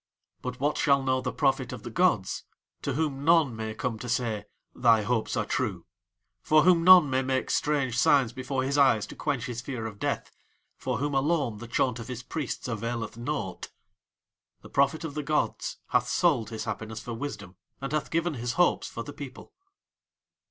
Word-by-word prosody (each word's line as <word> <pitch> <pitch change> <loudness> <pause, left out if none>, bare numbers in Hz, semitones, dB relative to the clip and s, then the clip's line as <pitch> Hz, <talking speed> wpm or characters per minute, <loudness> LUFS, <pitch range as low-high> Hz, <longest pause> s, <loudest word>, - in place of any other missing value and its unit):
But 125 0 -5
what 145 +3 0
shall 140 -2 +3
know 130 -1 +1
the 125 -1 -2
Prophet 135 -3 +1
of - - -7
the - - -6
gods, - - +1 0.4
to 140 - -2
whom 140 -1 -1
none 160 -6 +4
may 110 0 -4
come 115 -1 -3
to 125 - -6
say: 115 -4 -1 0.3
"Thy 115 -3 +4
hopes 115 0 -1
are - - 0
true," 100 -10 -2 0.6
for 155 +5 +4
whom 175 -1 +5
none 180 -3 +9
may 130 -1 +1
make 130 0 -1
strange 140 -5 +1
signs 130 -2 +4
before 130 0 -2
his 140 +2 0
eyes 115 -7 +4
to - - -11
quench 125 -5 -2
his 120 -1 -4
fear 125 -3 -5
of 105 -2 -7
death, - - -2 0.4
for 130 -2 -2
whom 145 +3 -1
alone 135 -5 +1
the 120 - -8
chaunt 125 0 0
of 115 - -7
his 125 -1 -6
priests 145 -3 -4
availeth 115 0 -3
naught? 120 -4 -4 0.9
The - - -11
Prophet 140 +4 +2
of 160 -3 -4
the 150 - -2
gods 150 +1 -1
hath - - +2
sold 140 - +2
his 110 -1 -5
happiness 110 0 -5
for 115 +1 -6
wisdom, 105 -7 -6 0.2
and 135 -1 -5
hath 155 -1 -1
given 165 0 0
his 120 -2 -3
hopes 175 0 +2
for 115 - -6
the 145 - -8
people. 140 -2 -10
130 Hz, 190 wpm, -28 LUFS, 115-145 Hz, 0.9 s, none